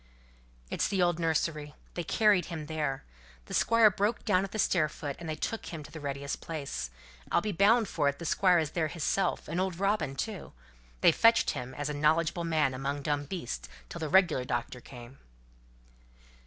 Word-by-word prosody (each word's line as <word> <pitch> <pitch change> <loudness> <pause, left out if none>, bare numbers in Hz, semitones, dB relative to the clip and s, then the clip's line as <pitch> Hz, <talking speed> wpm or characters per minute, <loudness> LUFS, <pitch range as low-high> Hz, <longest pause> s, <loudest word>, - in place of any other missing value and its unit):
"It's - - +1
the 195 - -1
old 175 -1 +1
nursery. 155 -2 -1 0.2
They 175 - -3
carried 205 +1 +3
him 160 -3 -6
there. 150 -3 -2 0.4
The - - -9
Squire 230 -2 +5
broke 205 +4 -1
down 185 +1 +3
at 195 - -5
the - - -4
stair 170 -6 +2
foot, 145 -2 -6
and 170 -2 -6
they 155 - -2
took 225 +7 -4
him 160 -3 -6
to 145 - -13
the 160 - -8
readiest 140 -1 -4
place. 140 - -4 0.4
I'll - - +4
be 210 +4 -2
bound 210 +5 +4
for 145 -5 +1
it 140 - -4
the 170 - -7
Squire 180 +1 +4
is 155 -3 0
there 165 -3 0
hisself, 175 +4 -1
and 175 - -1
old 185 -2 -2
Robin 195 -9 0
too. 205 +6 -5 0.5
They - - +7
fetched 230 +7 +4
him, 125 +1 -6
as 145 +2 -3
a 150 - -2
knowledgable 160 +3 +1
man 155 -5 +1
among 140 +2 -3
dumb 145 -1 -1
beasts, 120 - -5 0.2
till 170 - -7
th' 155 - -3
regular 175 -8 +4
doctor 125 0 -3
came." 125 +1 -12
160 Hz, 195 wpm, -30 LUFS, 145-185 Hz, 0.5 s, They